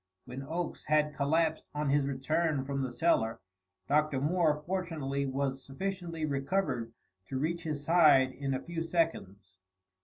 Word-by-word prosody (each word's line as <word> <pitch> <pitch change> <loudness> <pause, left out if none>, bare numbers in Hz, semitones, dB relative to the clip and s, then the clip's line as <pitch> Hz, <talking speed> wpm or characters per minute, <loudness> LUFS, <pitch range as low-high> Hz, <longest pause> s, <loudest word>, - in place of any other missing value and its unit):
When 125 +2 -7
Oakes 165 +5 -4
had 150 0 +2
collapsed 160 +3 +1
on 150 -1 0
his 140 -1 +2
return 145 +1 0
from 140 0 -2
the 130 -2 -2
cellar 120 -6 +1 0.5
Dr. 150 -1 +2
Moore 150 0 +1
fortunately 160 -7 -2
was 135 0 -2
sufficiently 170 +2 -4
recovered 140 -4 -1 0.4
to 130 - -3
reach 165 +5 -1
his 150 -4 -4
side 150 -5 +5
in 135 0 -2
a 130 - -4
few 170 -1 -4
seconds. 100 - -2
145 Hz, 145 wpm, -31 LUFS, 135-165 Hz, 0.5 s, side